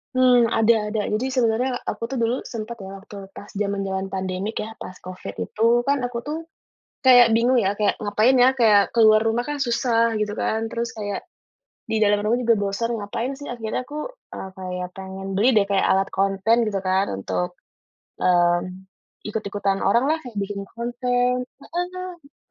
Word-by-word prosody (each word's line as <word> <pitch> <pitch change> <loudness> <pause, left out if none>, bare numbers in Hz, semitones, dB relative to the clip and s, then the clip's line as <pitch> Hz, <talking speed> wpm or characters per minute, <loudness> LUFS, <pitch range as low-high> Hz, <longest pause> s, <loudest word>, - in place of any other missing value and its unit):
Mmm, 250 -2 +5
ada 225 -1 +3
ada 210 0 -1
jadi 230 +5 0
sebenarnya 245 +1 +1
aku - - -4
tuh 270 - -5
dulu 240 +3 +1
sempat 230 0 -6
loh 195 0 -9
waktu 200 -2 -10
pas 205 - -10
zaman-zaman 195 -1 -2
pandemi 190 +3 -3
kayaknya 220 +1 -5
pas 185 - -8
Covid 180 - -8
itu 230 - +1
kan 280 +1 +1
aku 245 -1 -3
tuh, 300 +2 -3 0.6
kayak 245 -4 +7
bingung 240 +3 +3
ya 195 - +2
kayak 210 - +2
ngapain 215 +5 +3
ya 250 +1 +6
kayak 220 -6 +4
keluar 220 -2 +5
rumah 235 +4 0
kan 295 -1 -3
susah 230 -1 +2
gitu 210 0 -2
kan 220 +1 -1
terus 235 0 -3
kayak, 205 -2 -5 0.7
di 220 - 0
dalam 205 0 +3
rumah 215 +3 +1
juga 235 -2 +3
bosan 200 +4 -1
ngapain 230 +6 -3
sih 285 +1 -8
akhirnya 230 -1 -3
aku, 295 +1 -7 0.4
eee, 190 - -6
kayak 180 -1 -4
pengen 190 0 -7
beli 205 +6 +3
deh 200 - +5
kayak 200 -1 +1
alat 195 0 +2
konten 195 +3 +2
gitu 200 -2 -1
kan 190 +1 +2
untuk, 90 -2 -3 0.6
mmm, 175 +1 +2 0.4
ikut-ikutan 200 -2 -2
oranglah 265 +10 +3
kayak 235 - -9
bikin 200 0 -4
konten, 245 +1 0
heeh, 355 -2 -7
220 Hz, 170 wpm, -23 LUFS, 195-245 Hz, 0.7 s, kayak